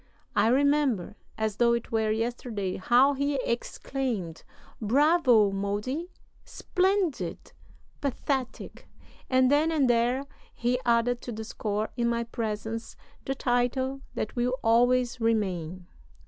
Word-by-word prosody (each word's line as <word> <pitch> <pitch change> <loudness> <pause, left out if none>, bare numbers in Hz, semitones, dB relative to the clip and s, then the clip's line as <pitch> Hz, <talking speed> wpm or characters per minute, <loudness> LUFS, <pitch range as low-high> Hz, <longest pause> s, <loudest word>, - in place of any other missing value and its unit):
I 205 - +4
remember, 270 -6 +2 0.2
as 220 -2 -2
though 235 -1 +4
it 235 -1 -3
were 220 -1 +1
yesterday, 220 -3 -2
how 245 +8 +4
he 280 +1 -1
exclaimed: 235 -7 -3 0.4
'Bravo, 255 - +4
Modi, 210 - -3 0.3
splendid! 375 -4 -1 0.5
Pathetic!' 270 -1 -3 0.4
And 255 0 +4
then 305 +3 +3
and 295 -5 +2
there 240 +2 +2 0.3
he 245 +1 0
added 235 +1 +2
to 245 - -6
the 220 0 -5
score, 215 -1 -3
in 240 -1 0
my 235 0 0
presence, 225 -1 -4 0.3
the 270 - -2
title 260 +2 0
that 215 - -3
will 250 +1 +1
always 245 +1 +3
remain." 185 -6 -1
240 Hz, 120 wpm, -27 LUFS, 220-265 Hz, 0.5 s, I